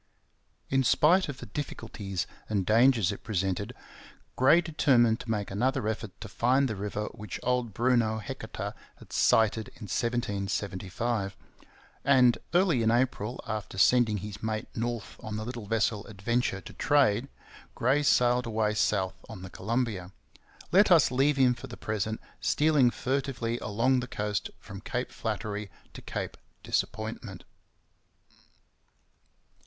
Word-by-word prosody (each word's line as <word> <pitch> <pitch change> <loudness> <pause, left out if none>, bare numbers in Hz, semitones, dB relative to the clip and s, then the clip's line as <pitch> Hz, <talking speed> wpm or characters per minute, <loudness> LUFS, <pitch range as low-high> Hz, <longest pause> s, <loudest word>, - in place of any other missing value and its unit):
In 135 0 +3
spite 165 +7 +4
of 135 - -5
the 125 - -8
difficulties 105 - -4 0.2
and 100 -4 0
dangers 115 -2 +4
it 100 - -7
presented, 95 -3 -1 0.6
Gray 140 +6 +6
determined 130 -9 +3
to - - -9
make 105 -3 -1
another 125 +3 0
effort 110 -3 -4
to 110 - -6
find 130 +6 +2
the 110 - -3
river 105 +1 -3
which 105 -3 -7
old 125 -2 0
Bruno 115 0 +2
Heceta 110 - -6 0.2
had - - -15
sighted 110 0 +3
in - - -13
1775. 100 -1 -2 0.7
And 130 -3 +5
early 175 -8 +3
in 110 - +3
April, 120 -1 0
after 110 -3 -5
sending 115 +1 +4
his 105 +1 -7
mate 110 -1 -2
north 115 -1 -3
on 110 -1 -6
the 110 - -4
little 120 -3 -6
vessel 105 -1 0
Adventure 110 0 -1
to - - -11
trade, 135 -5 +3 0.5
Gray 145 +2 +2
sailed 125 -3 +3
away 110 -1 0
south 95 -3 0
on 105 -5 -8
the 95 - -8
Columbia. 105 -4 -2 0.6
Let 200 +3 +6
us 165 -7 +6
leave 135 +3 +2
him 130 -2 +5
for 135 - -9
the 120 - -9
present 110 0 -2 0.2
stealing 150 -5 +3
furtively 130 -2 -2
along 120 +5 +1
the 125 - -4
coast 105 -4 -2
from - - -10
Cape - - -3
Flattery 105 -1 -4 0.2
to - - -9
Cape - - -5 0.3
Disappointment. 110 -2 -3
115 Hz, 140 wpm, -29 LUFS, 105-125 Hz, 0.7 s, Gray